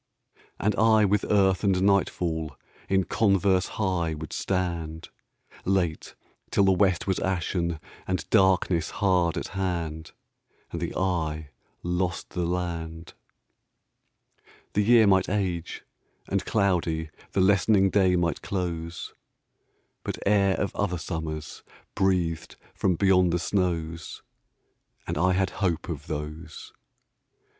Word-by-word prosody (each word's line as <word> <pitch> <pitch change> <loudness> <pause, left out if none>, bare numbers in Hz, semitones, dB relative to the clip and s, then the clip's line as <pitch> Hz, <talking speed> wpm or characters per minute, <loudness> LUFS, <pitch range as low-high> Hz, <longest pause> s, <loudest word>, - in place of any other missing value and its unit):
And 105 +1 +1
I 110 -1 +5
with 105 +1 +2
earth 95 -2 +3
and 95 -2 +3
nightfall 85 -6 +1 0.3
In 95 0 +3
converse 95 -2 +2
high 90 -6 0
would 75 -1 -7
stand, 85 -4 -2 0.5
Late, 90 -4 -1 0.3
till 100 - +3
the 95 - +5
west 95 -2 +2
was 95 -2 0
ashen 85 -2 -1 0.3
And 95 0 -2
darkness 95 -4 +3
hard 90 -4 +1
at - - -4
hand, 85 -5 -3 0.6
And 85 - -4
the 85 - -3
eye 80 -5 -1 0.3
lost 90 0 -2
the 90 -2 -1
land. 85 -2 -4 1.6
The 105 - +2
year 115 +1 +6
might 95 -2 +3
age, 90 -4 -2 0.4
and - - 0
cloudy 85 -6 0 0.2
The 95 - +2
lessening 95 0 +4
day 95 -3 +4
might 85 -4 0
close, 85 -3 -4 0.9
But - - -4
air 100 -2 +3
of 100 - -2
other 95 -3 -1
summers 80 -2 -5 0.3
Breathed 90 -4 0 0.2
from 95 -3 +1
beyond 90 -1 +4
the 85 - +1
snows, 85 -3 -2 0.8
And - - -3
I 90 +4 +2
had 95 0 +1
hope 85 -5 0
of - - -5
those. 75 +3 -6
90 Hz, 120 wpm, -26 LUFS, 85-95 Hz, 1.6 s, year